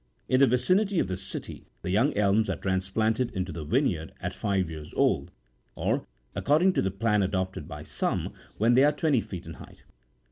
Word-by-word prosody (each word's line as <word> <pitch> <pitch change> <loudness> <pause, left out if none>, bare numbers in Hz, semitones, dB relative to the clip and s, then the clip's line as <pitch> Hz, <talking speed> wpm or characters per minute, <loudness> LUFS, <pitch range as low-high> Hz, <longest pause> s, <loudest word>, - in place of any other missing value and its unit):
In 130 - +3
the 135 - +7
vicinity 185 - +2
of 165 - +2
the 95 - -2
City, 95 +1 -6 0.2
the 90 - -2
young 115 +10 +3
elms 105 +2 +3
are - - 0
transplanted 110 +6 0
into 95 -1 -2
the 80 0 -5
vinejTard 90 - 0
at - - -4
five 95 -3 0
years 80 -2 -9
old, - - +2 0.5
or, - - -1 0.3
according 165 +6 +3
to - - +1
the 95 - 0
plan 105 +2 +1
adopted 95 -1 -2
by - - -8
some, - - -2 0.2
when 115 +3 +3
they 130 +2 +6
are 145 - +5
twenty 145 -7 +2
feet 90 -4 -8
in 80 - -7
height. - - -14
105 Hz, 190 wpm, -27 LUFS, 95-130 Hz, 0.5 s, the